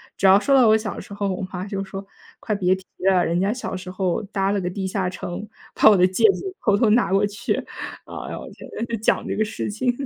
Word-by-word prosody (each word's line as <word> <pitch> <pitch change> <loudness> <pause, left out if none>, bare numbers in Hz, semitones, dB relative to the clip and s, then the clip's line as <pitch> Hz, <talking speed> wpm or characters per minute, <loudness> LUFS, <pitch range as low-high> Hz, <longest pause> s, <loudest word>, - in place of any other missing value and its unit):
只 195 - +2
要 190 +1 +7
说 275 +6 +1
到 255 -4 +6
我 215 - +6
小 215 -2 -5
时 200 - -9
候， 200 0 -1
我 185 - -5
妈 185 0 -4
就 195 -1 -3
说： 195 +1 -7 0.3
“快 215 - -2
别 185 -2 +2
提 190 0 -13 0.3
了， 180 -2 +3
人 170 +1 0
家 195 +2 +1
小 245 -4 -4
时 185 0 -7
候 185 0 -1
搭 195 -1 -1
了 200 -1 0
个 180 - -2
地 190 +1 -4
下 190 -1 -1
城， 180 +3 -6 0.2
把 - - +6
我 205 - +5
的 180 - +5
戒 185 - +2
指 380 -1 -6
偷 205 -2 +3
偷 220 -1 +3
拿 230 -3 +3
过 195 +1 +3
去。” 205 +3 -2 0.5
哎 - - -7
呦 - - -5
我 - - -9
天， - - -12 0.2
就 235 - -3
讲 215 - +1
这 - - -2
个 215 - +2
事 210 -1 -4
情。 245 +4 0
200 Hz, 280 characters per minute, -23 LUFS, 185-215 Hz, 0.5 s, 要